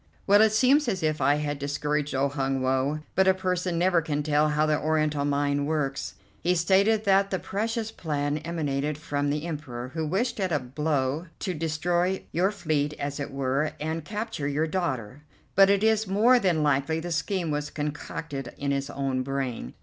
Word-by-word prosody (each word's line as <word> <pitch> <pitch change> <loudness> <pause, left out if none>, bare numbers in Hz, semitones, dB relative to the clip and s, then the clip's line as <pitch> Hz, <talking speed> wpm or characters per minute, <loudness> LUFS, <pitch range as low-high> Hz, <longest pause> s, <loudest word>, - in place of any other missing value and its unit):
"Well, 205 +1 +6
it 220 0 +5
seems 260 +6 +4
as 190 -7 -1
if 155 -1 0
I 145 - +4
had 145 -1 -2
discouraged 145 0 -1
old 135 +1 +1
Hun 135 -2 -1
Woe, 135 +3 0
but 190 0 +3
a 190 - +5
person 180 -2 -1
never 175 0 +3
can 150 -2 -2
tell 150 0 +2
how 150 +1 +2
the 155 -1 +1
Oriental 155 -2 +1
mind 145 0 0
works. 145 -3 -2 0.3
He 180 +1 +2
stated 200 +5 +3
that 195 0 +4
the 190 - 0
precious 225 +4 -2
plan 150 -5 -2
emanated 150 -3 -2
from 145 -2 -2
the 150 +2 -2
Emperor, 135 -7 -5
who 160 +2 -3
wished 215 +9 -1
at 190 -2 0
a 155 - +3
blow 145 +3 -1
to 185 - -1
destroy 175 +4 0
your 180 +4 +2
fleet, 155 -7 -1
as 140 +1 -3
it 145 - -3
were, 135 +2 -1
and 160 +1 -3
capture 210 -5 -4
your 145 +2 0
daughter; 145 - -3 0.3
but 195 0 +6
it 200 +1 +3
is 220 -1 +3
more 225 +6 +5
than 175 -7 +1
likely 145 +2 +1
the 175 +1 -5
scheme 175 0 -1
was 150 0 -2
concocted 150 -1 -5
in 140 0 -1
his 140 0 -1
own 135 -2 -1
brain. 130 - -3
155 Hz, 190 wpm, -26 LUFS, 145-185 Hz, 0.3 s, Well